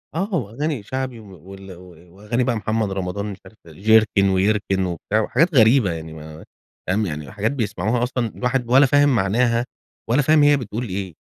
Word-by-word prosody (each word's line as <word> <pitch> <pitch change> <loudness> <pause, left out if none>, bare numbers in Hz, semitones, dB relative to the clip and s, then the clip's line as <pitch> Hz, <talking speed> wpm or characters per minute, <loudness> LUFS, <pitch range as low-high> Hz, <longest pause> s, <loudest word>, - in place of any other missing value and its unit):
آه، 195 +4 -2
وأغاني 135 - -3
شَعبي 130 +1 -5
وال 95 -1 -13
و 90 -1 -17
وأغاني 105 +5 -2
بقى 120 -1 0
محمد 110 -1 -2
رمضان 95 +1 -4
مش 100 -2 -6
عارف 100 +3 -16 0.2
جركن، 105 -1 +3
ويركن 95 0 +1
وبتاع، 90 +5 -1
وحاجات 160 +9 +1
غريبة، 115 -4 +5
يعني 80 -1 -7
ما 80 0 -11 0.4
فاهم، 105 +4 0
يعني 75 -4 -6
حاجات 110 +1 -1
بيسمعوها 110 -2 -1
أصلًا 125 -1 -1
الواحد 125 -1 -2
ولا 135 +2 +6
فاهم 145 0 +3
معناها، 115 +4 +1 0.4
ولا 130 +5 +3
فاهم 155 +1 +4
هي 145 -1 +5
بتقول 120 0 -5
إيه. 95 -1 -5
110 Hz, 170 wpm, -21 LUFS, 95-125 Hz, 0.4 s, ولا